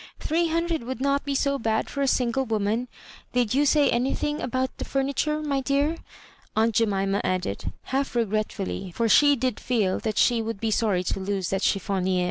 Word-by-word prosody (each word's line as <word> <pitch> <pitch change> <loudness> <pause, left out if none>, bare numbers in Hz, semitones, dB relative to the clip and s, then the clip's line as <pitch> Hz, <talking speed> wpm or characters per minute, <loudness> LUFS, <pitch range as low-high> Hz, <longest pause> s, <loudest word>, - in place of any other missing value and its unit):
Three 335 +2 +1
hundred 335 0 0
would 255 +1 -5
not 280 +1 +1
be 280 -1 -1
so 280 0 +1
bad 220 -1 0
for 280 - -4
a 275 - +2
single 255 0 +1
woman. 220 +1 -1 0.5
Did 245 -3 +1
you 285 +2 +3
say 295 -1 +4
anything 275 +4 -1
about 255 +1 -2
the - - -2
furniture, 280 +3 -1
my 280 -2 0
dear?" 285 +5 +1 0.6
aunt 225 +1 +2
Jemima 200 -2 +1
added, 100 - -2
half 270 0 -2
regretfully, 215 -4 -2
for 230 - +1
she 290 +5 +6
did 255 -2 -1
feel 210 -7 0
that 215 -3 -3
she 235 -2 +4
would 225 -2 -4
be 225 0 -1
sorry 205 -5 +1
to 185 - -2
lose 190 -2 -2
that 195 0 0
chiflfonier." 190 -2 0
235 Hz, 185 wpm, -25 LUFS, 205-275 Hz, 0.6 s, she